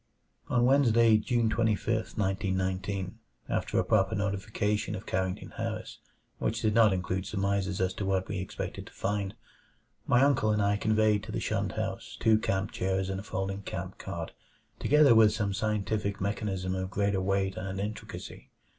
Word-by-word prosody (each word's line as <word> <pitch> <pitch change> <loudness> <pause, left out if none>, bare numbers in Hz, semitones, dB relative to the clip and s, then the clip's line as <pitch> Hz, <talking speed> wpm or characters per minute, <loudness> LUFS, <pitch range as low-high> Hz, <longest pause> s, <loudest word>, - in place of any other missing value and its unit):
4 125 - 0
On 120 - +4
Wednesday, 115 -4 +5
June 115 +1 +1
25, 110 0 0
1919, 95 -1 -1 0.3
after - - -1
a - - +4
proper 105 -1 +2
notification 105 +1 -1
of 95 - -7
Carrington 95 -1 -2
Harris - - -5 0.4
which 115 +1 -1
did 110 -1 +2
not 110 -2 +6
include 95 0 -2
surmises 100 -1 -1
as 95 0 +1
to - - -4
what 95 -1 0
we 100 -1 -3
expected 95 - -5
to - - -14
find, 100 -1 -2 0.7
my 125 +2 +5
uncle 135 -6 +3
and 105 0 +2
I 100 0 +2
conveyed 110 -1 +2
to 110 - -7
the - - -2
shunned - - -1
house - - -4
two 110 -1 +4
camp 95 -1 -1
chairs 95 0 -1
and 95 - -3
a - - -7
folding 95 -1 -3
camp 95 -1 -6
cot, - - -5 0.5
together 150 -3 +6
with 110 -2 +6
some 105 -2 -1
scientific 105 -1 -1
mechanism 95 -2 -2
of 95 0 -2
greater 100 -1 0
weight 95 0 0
and 95 +1 -4
intricacy. 105 +2 -6
100 Hz, 165 wpm, -29 LUFS, 95-110 Hz, 0.7 s, not